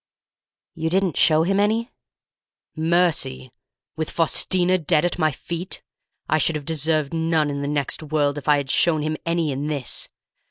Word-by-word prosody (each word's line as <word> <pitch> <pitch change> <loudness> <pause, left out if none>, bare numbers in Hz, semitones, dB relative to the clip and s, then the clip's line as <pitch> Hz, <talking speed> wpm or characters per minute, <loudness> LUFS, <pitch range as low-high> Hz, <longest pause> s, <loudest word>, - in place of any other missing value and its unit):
"You 160 0 -2
didn't 185 -3 +1
show 155 0 +4
him 195 +3 +1
any?" 220 +4 +1 0.8
"Mercy? 160 - 0 0.4
With 160 -1 -3
Faustina 180 +2 +2
dead 160 0 +2
at 175 - -2
my 155 -1 +3
feet? 170 +6 -5 0.4
I 155 - +2
should 155 +2 +1
have 150 -2 -5
deserved 155 -1 0
none 160 -2 +1
in 140 0 -3
the 140 - -2
next 145 0 -1
world 145 -2 0
if 145 - -15
I 150 -1 +5
had 140 -2 -2
shown 160 -3 +2
him 155 +1 -1
any 165 -3 0
in 140 +2 -3
this! 145 -5 -3
155 Hz, 165 wpm, -22 LUFS, 145-170 Hz, 0.8 s, I